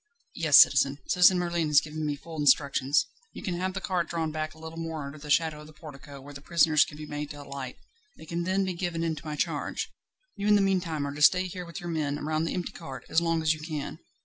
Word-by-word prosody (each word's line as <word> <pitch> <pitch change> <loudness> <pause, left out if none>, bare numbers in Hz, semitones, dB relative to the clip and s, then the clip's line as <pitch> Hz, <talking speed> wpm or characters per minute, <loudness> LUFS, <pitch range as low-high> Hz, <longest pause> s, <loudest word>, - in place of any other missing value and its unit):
"Yes, - - +5
citizen; - - +6
Citizen 180 - +5
Merlin 170 -2 0
has 150 -1 +6
given 155 +1 -5
me 145 - -1
full 160 +2 -9
instructions. 140 -1 +3 0.3
You - - -9
can 185 -6 -2
have 185 +1 -2
the - - -1
cart 180 -3 -2
drawn 165 -2 -2
back 155 0 -4
a - - -17
little 160 +1 -8
more 160 -3 -4
under 140 +2 -9
the 150 0 -10
shadow 155 0 +2
of 150 - -12
the 155 - -15
portico, 145 -2 -11
where 145 +2 -11
the 140 - -10
prisoners 155 -1 +4
can 150 - -9
be 155 - -7
made 150 0 -5
to 145 -1 -8
alight; 140 -2 -7 0.4
they - - -12
can 170 +2 -3
then 190 +2 +1
be 185 - -2
given 170 -1 -3
into 160 -3 -3
my 155 -1 -5
charge. - - -2 0.4
You 205 +1 -3
in 210 - +6
the - - +5
meantime 180 -6 0
are 140 - -4
to 145 - -7
stay 180 +5 +6
here 180 0 -6
with 170 +3 -8
your 175 -2 -6
men, 150 -3 -1
round 155 +1 0
the - - -2
empty 180 -1 -3
cart, 165 - -9
as 165 - +3
long 165 -1 0
as 160 0 +3
you 155 - -9
can. 155 -2 -5
160 Hz, 255 wpm, -28 LUFS, 150-170 Hz, 0.4 s, citizen